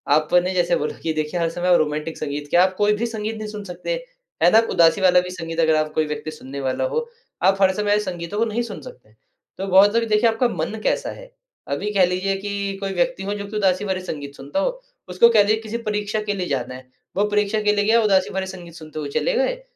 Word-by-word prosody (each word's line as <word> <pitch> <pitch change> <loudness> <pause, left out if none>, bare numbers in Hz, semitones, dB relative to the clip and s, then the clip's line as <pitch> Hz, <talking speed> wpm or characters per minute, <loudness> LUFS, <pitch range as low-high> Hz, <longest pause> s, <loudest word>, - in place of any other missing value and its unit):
आपने 175 +4 +2
जैसे 175 -2 +2
बोला 150 - -3
कि 160 - 0
देखिए 155 +3 -2
हर 165 -1 +1
समय 175 +1 +2
रोमांटिक 155 +1 -2
संगीत 145 0 -4
क्या 175 - +5
आप 185 0 +1
कोई 210 0 +3
भी 215 +3 -1
संगीत 220 -1 -4
नहीं 215 - -5
सुन 210 -1 -7
सकते। 180 - -6 0.5
है 175 - +6
ना, 220 - +6
आप 225 0 +4
उदासी 170 +4 +4
वाला 180 -1 +6
भी 180 - -7
संगीत 165 -2 -6
अगर 160 -1 +4
आप 155 0 0
कोई 155 - +1
व्यक्ति 150 +1 -5
सुनने 140 -2 -8
वाला 130 -1 -1
हो, 475 -1 -2 0.4
आप 195 +1 +3
हर 190 - +6
समय 210 +1 +1
संगीतों 180 -1 -5
को 230 - +3
नहीं 230 +2 -2
सुन 205 -9 -6
सकते, 120 -5 -14 0.4
तो 195 - -4
बहुत 195 +3 +5
लोग 230 - +3
देखिए 215 +2 +4
आपका 225 +3 +1
मन 170 +7 -3
कैसा - - 0
है, - - -12 0.4
अभी 210 - -2
कह 190 -2 +5
लीजिए 185 +2 -1
कि 200 0 -3
कोई 195 0 -2
व्यक्ति 195 +3 0
हो 200 +1 -2
जो 205 -1 -5
कि 210 - -8
उदासी 195 -1 +1
वाले 190 -2 -2
संगीत 145 -4 -6
सुनता 140 - -4
हो, - - -2 0.3
उसको 185 +6 +5
कह 220 -3 +5
लीजिए 215 +2 +1
किसी 220 +1 -4
परीक्षा 210 -2 -2
के - - +2
लिए 185 -3 -3
जाना 130 -4 -2
है, 130 0 -13 0.3
वो 200 - +3
परीक्षा 210 +1 +1
के 210 0 +2
लिए 205 0 +1
गया 230 +2 +4
उदासी 195 -3 +3
भरे 190 0 -2
संगीत 180 -3 -9
सुनते 155 -2 -9
हुए 145 - -4
चले - - 0
गए - - 0
190 Hz, 250 wpm, -22 LUFS, 165-210 Hz, 0.5 s, है